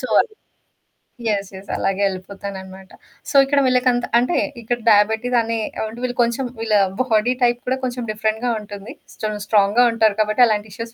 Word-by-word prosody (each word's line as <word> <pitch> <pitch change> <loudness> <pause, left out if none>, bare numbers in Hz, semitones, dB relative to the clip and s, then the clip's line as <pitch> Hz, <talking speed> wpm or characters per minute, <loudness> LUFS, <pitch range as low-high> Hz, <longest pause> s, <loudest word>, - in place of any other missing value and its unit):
So, - - -4
అది. 435 -2 -3 0.9
Yes. 200 -3 -1
Yes. 190 +1 -12
అలాగే 195 +1 -1
ఎళ్ళిపోతాననమాట. 190 0 -8 0.4
So, - - -6
ఇక్కడ 280 +1 +2
వీళ్ళకంత 250 -1 +2
అంటే 250 +8 0 0.2
ఇక్కడ 240 +2 -2
డయాబెటీస్ 220 +4 +3
అనే 230 0 -2 0.3
అంటే 225 +2 -8
వీళ్ళు 245 -1 -2
కొంచెం 235 +3 -1
వీళ్ళ 225 -1 0 0.3
బాడీ 235 -1 +2
టైప్ 240 0 +2
కూడా 255 +1 0
కొంచెం 250 -1 -3
డిఫరెంట్‌గా 220 +3 -1
ఉంటుంది. 205 0 -9 0.2
స్టన్ 215 -1 -4
స్ట్రాంగ్‌గా 210 +3 +4
ఉంటారు 220 -3 +2
కాబట్టి 215 +4 +3
అలాంటి 215 -1 -1
ఇష్యూస్ 230 +1 -7
220 Hz, 160 wpm, -20 LUFS, 205-245 Hz, 0.9 s, స్ట్రాంగ్‌గా